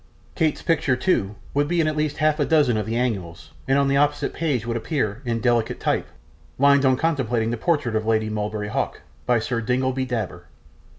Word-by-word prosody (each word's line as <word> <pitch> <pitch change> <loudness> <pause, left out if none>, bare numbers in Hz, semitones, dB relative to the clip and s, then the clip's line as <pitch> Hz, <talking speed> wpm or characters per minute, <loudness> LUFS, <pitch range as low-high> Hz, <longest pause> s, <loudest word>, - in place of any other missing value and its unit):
Kate's 155 -2 0
picture, 150 -6 +2
too, 105 - 0 0.2
would 145 +1 +1
be 175 +2 0
in 160 - +3
at 155 - -1
least 150 -1 -1
half 155 +1 +2
a 145 - +2
dozen 150 -7 +3
of 105 -1 -2
the 115 - -2
annuals, 95 -9 -3 0.2
and 135 +1 +3
on 140 0 +3
the 140 0 +2
opposite 145 +1 +1
page 140 -8 -1
would 120 0 -2
appear, 115 -3 -2
in 115 -1 -1
delicate 120 -2 +1
type, - - 0 0.5
'Lines 140 0 +5
on 130 -1 +4
contemplating 125 -8 0
the - - 0
Portrait 145 -4 0
of 110 0 -1
Lady 110 -1 +2
Mulberry 105 0 -3
Hawk. - - -2 0.3
By 125 -1 +4
Sir 115 +1 -2
Dingleby 130 +2 0
Dabber. 120 -3 -4
125 Hz, 200 wpm, -23 LUFS, 110-145 Hz, 0.5 s, Lines